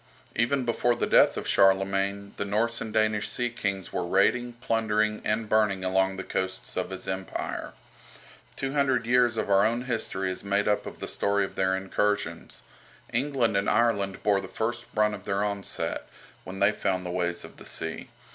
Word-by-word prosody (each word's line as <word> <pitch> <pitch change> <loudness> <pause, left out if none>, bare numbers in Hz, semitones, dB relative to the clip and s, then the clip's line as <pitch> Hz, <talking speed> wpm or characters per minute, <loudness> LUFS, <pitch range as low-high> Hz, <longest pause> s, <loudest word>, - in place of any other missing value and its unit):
Even 125 +3 +1
before 120 0 +2
the 120 - 0
death - - +5
of - - -4
Charlemagne 95 +1 +2
the - - -1
Norse 115 +4 0
and 110 - -4
Danish 110 -1 +1
sea 120 -1 -1
kings 100 -4 -3
were 90 - -1
raiding, 110 +7 +2
plundering, 110 -2 0
and 110 +1 0
burning 105 -3 +2
along 95 +1 +1
the 95 - -4
coasts 95 0 -4
of 90 - -2
his 95 -1 -6
Empire. 95 0 -4 0.8
Two 135 0 -3
hundred 135 -4 +2
years 120 -1 +3
of - - -1
our 100 0 +5
own 120 +3 +1
history 105 -6 -2
is 95 - -6
made 100 +1 +1
up 105 -1 +1
of - - -9
the - - -3
story 100 0 +1
of - - -9
their 95 0 +1
incursions. 100 +2 -2 0.5
England 125 -3 +1
and 100 0 +2
Ireland 100 -5 +1
bore 100 -2 +3
the 95 - -7
first 120 +3 -3
brunt 105 -1 +3
of 100 -2 -8
their 100 0 0
onset, 100 -1 -3 0.4
when 95 +1 -7
they 100 +1 +5
found 95 -3 -1
the 90 - -3
ways 85 -1 -1
of - - -14
the - - -12
sea. - - -4
105 Hz, 185 wpm, -27 LUFS, 95-115 Hz, 0.8 s, death